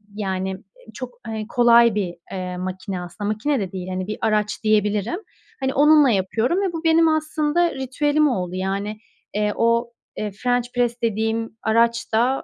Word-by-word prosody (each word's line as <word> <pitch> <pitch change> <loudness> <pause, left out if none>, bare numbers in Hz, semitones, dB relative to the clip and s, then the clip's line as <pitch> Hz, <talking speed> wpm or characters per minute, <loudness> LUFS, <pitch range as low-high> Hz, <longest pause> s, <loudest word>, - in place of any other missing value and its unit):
yani, 190 -2 -2 0.4
çok, 255 -2 -8
hani, 220 -1 -4
kolay 235 -2 +5
bir, 185 -4 -2 0.2
eee, 180 -1 -4
makine 185 +1 -4
aslında. 180 +4 -6
Makine 240 +7 0
de 190 -3 -4
değil, 185 -1 -6
hani, 185 0 -3
bir 215 - -4
araç 210 0 0
diyebilirim. 210 - +1 0.4
Hani, 265 -1 -1
onunla 295 0 +6
yapıyorum 225 - +1
ve 380 -3 -1
bu 330 0 -5
benim 325 0 +5
aslında 315 +2 +1
ritüelim 290 +3 +1
oldu. 180 -7 -2
Yani, 200 +3 -3 0.3
eee, 210 0 0
o, 235 +1 +1 0.3
eee, 210 -1 -3
french 245 +4 0
press 240 -1 0
dediğim 225 0 -1
araç 230 +1 +1
da, 245 +4 +2
225 Hz, 160 wpm, -22 LUFS, 200-260 Hz, 0.4 s, onunla